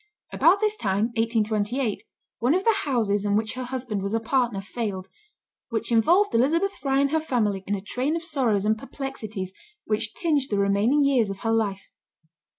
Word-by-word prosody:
About 375 +5 +4
this 430 0 +2
time, 205 - 0
1828, 225 +1 0 0.4
one 250 +7 +2
of 375 - 0
the 455 - +4
houses 215 -7 +1
in 205 -1 +1
which 220 0 0
her 255 0 -5
husband 245 -5 -4
was 200 +3 -2
a - - +2
partner 235 -2 0
failed, 195 -2 -4 0.6
"which 230 0 -2
involved 345 - +4
Elizabeth 320 +12 +2
Fry 270 -1 -1
and 280 0 +2
her 320 - +2
family 215 -10 -1
in 205 - 0
a 195 - -5
train 255 +9 -1
of 335 - -3
sorrows 245 - 0
and 215 +1 +1
perplexities 220 -9 -6 0.3
which 215 +1 -2
tinged 300 -6 0
the 205 - 0
remaining 200 +8 +3
years 260 -7 +3
of 195 -1 -6
her 225 - 0
life." 205 -4 -1
230 Hz, 180 wpm, -25 LUFS, 205-275 Hz, 0.6 s, About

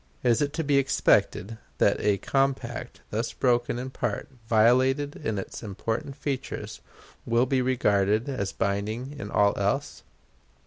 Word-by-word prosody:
Is 120 0 +3
it 145 -1 +1
to 160 - -1
be 140 -1 +3
expected 115 -5 +2 0.2
that - - +3
a 105 -1 +2
compact 130 -1 -1
thus 115 +2 -2
broken 120 -1 +1
in 130 +2 -5
part, 115 -5 -3 0.2
violated 130 +6 +3
in 110 -8 -3
its 95 - -6
important 115 +7 -4
features, 135 -2 -4 0.4
will 115 +2 +2
be 130 0 +1
regarded 110 -3 +2
as 100 -8 -2
binding 105 +8 -2
in - - -5
all 100 -1 +3
else? - - -1
120 Hz, 140 wpm, -27 LUFS, 110-135 Hz, 0.4 s, Is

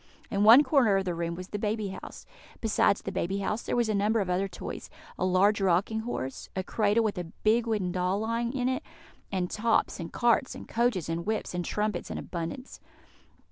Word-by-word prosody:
In 200 0 +1
one 235 +7 +9
corner 245 -10 +4
of 195 - -1
the 180 - -1
room 170 0 -3
was 185 +1 -8
the 205 - -4
baby 210 -1 -1
house. 190 - -9 0.3
Besides 215 -2 +2
the 195 - -4
baby 190 +1 -1
house, 210 +3 -1
there - - -2
was 240 -2 +2
a 215 - 0
number 210 +3 +2
of 190 -3 -1
other 190 +2 +1
toys - - -7 0.3
a - - -3
large 195 +3 +3
rocking 195 +4 +2
horse, 220 - -5
a 190 - -1
cradle 215 +3 +2
with 205 -4 -1
a 175 - -4 0.2
big 230 +2 +3
wooden 205 -5 0
doll 180 +2 0
lying 230 +1 -1
in 250 -2 -1
it, 260 0 0 0.5
and 185 -2 -1
tops, 225 -1 +1
and 170 - -6
carts, 240 +1 +2
and - - -9
coaches, 230 -7 0
and 165 +3 -3
whips, 220 -4 -2
and 180 0 -2
trumpets 210 -3 -2
in - - -4
abundance. 175 +10 -6
205 Hz, 210 wpm, -28 LUFS, 185-225 Hz, 0.5 s, one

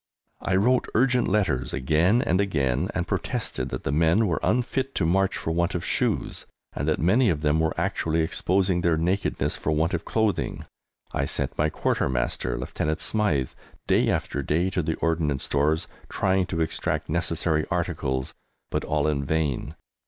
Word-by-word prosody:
I 95 - 0
wrote 125 +7 +3
urgent 125 +1 +3
letters 90 -11 0
again 80 - +2
and 90 +3 +2
again, 70 -11 0
and - - -1
protested 65 0 -2
that - - -5
the - - -1
men 80 +8 +3
were 85 -5 0
unfit 125 +3 0
to 90 - +1
march 95 +3 +2
for 80 - -3
want 85 +3 0
of 90 - -3
shoes, - - -1 0.3
and 70 - -3
that 80 - +2
many 110 - +3
of 75 -4 0
them 75 0 +2
were 80 0 0
actually 80 0 0
exposing 90 +2 +1
their 85 -2 +2
nakedness 90 +5 0
for - - -3
want 80 +4 +1
of 85 - -1
clothing. 110 -2 -1 0.5
I - - 0
sent - - -2
my 75 +1 +1
Quartermaster, 60 -4 -1
Lieutenant 80 +1 -2
Smythe, 80 -13 0 0.3
day - - +3
after 70 - -1
day, 85 +7 0
to 90 - 0
the 80 0 -1
Ordnance 80 -4 0
Stores 75 +3 +1 0.2
trying 95 -1 +1
to 85 -3 -2
extract 80 0 -1
necessary 85 -1 +1
articles, 65 0 -2 0.4
but - - -1
all 75 -1 0
in 70 -2 0
vain! 75 -2 -1
80 Hz, 165 wpm, -25 LUFS, 75-95 Hz, 0.5 s, wrote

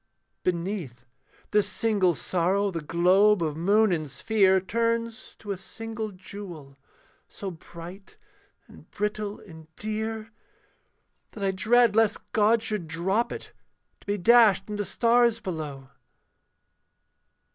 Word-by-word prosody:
Beneath 170 - -3 0.5
this 210 -1 +3
single 200 -6 +1
sorrow 190 +5 0
the 165 -2 -4
globe 180 +5 +3
of 155 -2 -2
moon 205 +6 +3
and 155 -4 -1
sphere 190 - +3
Turns 230 +4 -2
to 205 - -7
a 195 - -3
single 225 +2 -6
jewel, 180 -7 -10 0.5
so 195 -2 -6
bright 175 +3 -12 0.5
and - - -17
brittle 210 0 -3
and 160 -4 -13
dear 220 +1 -4 1.0
That 205 - -7
I 195 - +2
dread 225 +3 +3
lest 225 -1 +1
God 220 +1 +3
should 210 -6 -3
drop 190 +8 0
it, - - -8 0.5
to - - -24
be 205 0 0
dashed 225 0 +5
into 205 -1 -3
stars 235 +3 +3
below. 150 - -6
200 Hz, 120 wpm, -26 LUFS, 175-220 Hz, 1.0 s, dashed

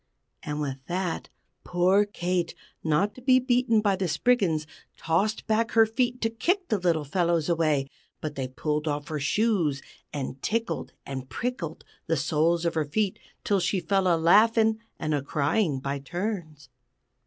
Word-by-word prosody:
_" - - -49 0.4
And 150 0 -4
with 135 -2 -3
that, 180 -1 -2 0.3
poor 185 +3 +3
Kate, 180 -3 -2 0.3
not 170 +7 +2
to 255 - -13
be 255 0 +5
beaten 245 -3 +2
by 200 -2 +2
the 190 -1 -1
Spriggans, 170 -3 +2 0.3
tossed 200 +7 0
back 225 +1 +1
her 225 0 +7
feet 245 +2 -1
to 225 - +2
kick 360 - 0
the 215 - +1
little 170 -4 +1
fellows 170 +1 +1
away, 155 -5 +2 0.3
but 155 -1 -4
they 135 -3 -3
pulled 150 +4 -2
off 145 0 -2
her 155 -1 -2
shoes 165 -3 +1 0.3
and 135 -2 -5
tickled 230 +1 -2
and 130 -1 -6
prickled 170 - -4 0.2
the 165 0 +1
soles 165 +4 +1
of 170 - +1
her 160 -2 0
feet 195 +6 -1 0.2
until 200 -1 +2
she 185 +2 0
fell 195 0 +1
a 170 -2 +4
laughing 220 +6 +4 0.2
and 155 -1 -2
a 145 - +1
crying 145 +2 0
by 140 +1 -3
turns. 160 - -5
175 Hz, 165 wpm, -27 LUFS, 150-215 Hz, 0.4 s, her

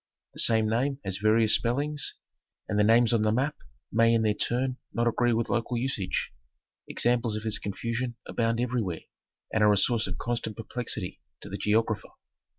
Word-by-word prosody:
The - - -4
same 110 -1 +4
name 130 +5 0
has 95 -1 0
various 110 +1 +4
spellings, 145 +5 0 0.5
and 105 -1 0
the - - +5
names 115 +2 +4
on 115 - +3
the 110 0 +2
map 135 +7 0 0.4
may 115 +1 +4
in 115 - +2
their 105 -1 +2
turn 125 +4 -1
not 120 0 0
agree 120 +1 +2
with 115 0 0
local 120 +1 -1
usage. 115 -6 -2 0.5
Examples 120 -2 +1
of 110 - -4
this 110 -1 0
confusion 115 +4 -3
abound 115 0 0
everywhere, 115 -8 -1 0.5
and 110 - +3
are 105 - +6
a - - +2
source 115 +2 +2
of - - -5
constant 115 -2 -3
perplexity 115 -4 -4 0.2
to - - -9
the 100 - -4
geographer. 110 +1 0
115 Hz, 175 wpm, -28 LUFS, 110-120 Hz, 0.5 s, are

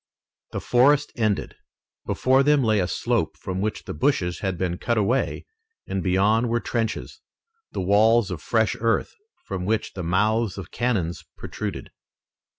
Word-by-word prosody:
The - - -3
forest 145 +4 +3
ended. 110 -4 -1 0.5
Before 130 +1 +3
them 145 0 +4
lay 110 -2 +3
a 90 - +1
slope, - - -1
from 95 0 -4
which 110 +1 -2
the - - -6
bushes 90 - 0
had 95 -2 -2
been 90 -1 -2
cut 120 -1 0
away 115 +6 0 0.4
and 95 - -2
beyond 100 +6 +2
were 120 +1 +1
trenches, 115 -2 -3 0.5
and 90 - -3
walls 105 +2 +4
of 85 -4 -5
fresh 110 +3 +1
earth, 115 0 0 0.3
from 95 -2 -4
which 110 +3 -1
the 95 - -5
mouths 105 +5 +1
of 95 -3 -8
cannon 110 -9 0 0.3
protruded. - - -6
110 Hz, 155 wpm, -24 LUFS, 95-120 Hz, 0.5 s, them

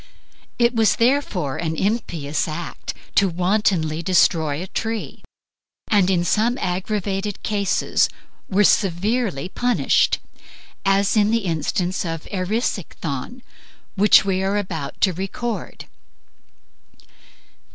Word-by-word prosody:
It 235 0 +3
was 225 -2 +3
therefore 230 - +1
an 160 -1 -2
impious 170 -8 -1
act 165 +2 -6 0.3
wantonly 180 -3 +1
to - - -3
destroy 160 -4 +2
a 180 - -4
tree, 225 +3 -4 0.7
and 200 -4 +4
in 180 -3 +2
some 230 +6 +2
aggravated 195 0 -2
cases 200 -3 +1 0.4
were 205 +2 +3
severely 195 - +1
punished, 245 +6 +2 0.7
as 195 +2 +3
in 210 -1 +4
the 225 -2 +1
instance 175 +2 -1
of 165 -2 -5
Erisichthon, 195 - -3 0.5
which 205 0 +5
we 190 -1 0
are 195 +2 0
about 165 -8 -4
to 190 - +3
record. 195 +6 -5
195 Hz, 105 wpm, -22 LUFS, 170-215 Hz, 0.7 s, which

